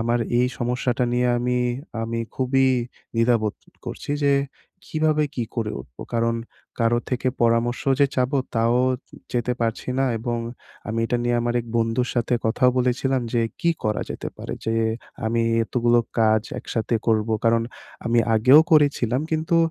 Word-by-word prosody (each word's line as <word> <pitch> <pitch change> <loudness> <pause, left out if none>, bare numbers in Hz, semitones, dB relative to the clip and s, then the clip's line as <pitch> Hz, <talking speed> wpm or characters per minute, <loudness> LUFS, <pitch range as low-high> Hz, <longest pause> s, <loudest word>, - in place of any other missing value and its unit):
আমার 120 +1 +1 0.2
এই 125 +1 +3
সমস্যাটা 125 0 0
নিয়ে 125 0 +2
আমি, 125 +1 0 0.4
আমি 115 +1 -2
খুবই 130 0 +2 0.5
দ্বিধাবোধ 115 -2 +2 0.3
করছি - - -6
যে 140 - +4 0.5
কিভাবে 155 -1 +1
কি 120 - -1
করে 110 -3 -2
উঠবো! 65 -1 -11
কারণ 115 0 +1 0.5
কারো 115 +1 +3
থেকে 125 0 0
পরামর্শ 115 +1 +2 0.2
যে 140 - +6
চাবো 130 +2 +1 0.2
তাও 115 +2 +3 0.5
চাইতে 125 0 0
পারছি 115 +1 -2
না 135 - +3
এবং 120 +1 -2 0.5
আমি 110 +1 -2
এটা 120 - 0
নিয়ে 120 0 +1
আমার 120 0 -1
এক 115 - -11
বন্ধুর 115 +2 +1
সাথে 120 0 +1
কথাও 125 +3 +3
বলেছিলাম 125 +1 +1
যে 115 - +3 0.2
কি 170 - +3
করা 105 0 0
যেতে - - -4
পারে? - - -6
যে 115 - 0 0.5
আমি 115 +1 +1 0.2
এতগুলো 120 0 +2 0.2
কাজ 110 -1 +4 0.2
একসাথে 115 +1 -2
করবো, 110 0 +2
কারণ 115 0 +4 0.4
আমি 120 0 +2 0.2
আগেও 130 +8 +7
করেছিলাম 140 -5 +3
কিন্তু 160 +1 +1
120 Hz, 150 wpm, -23 LUFS, 115-125 Hz, 0.5 s, আগেও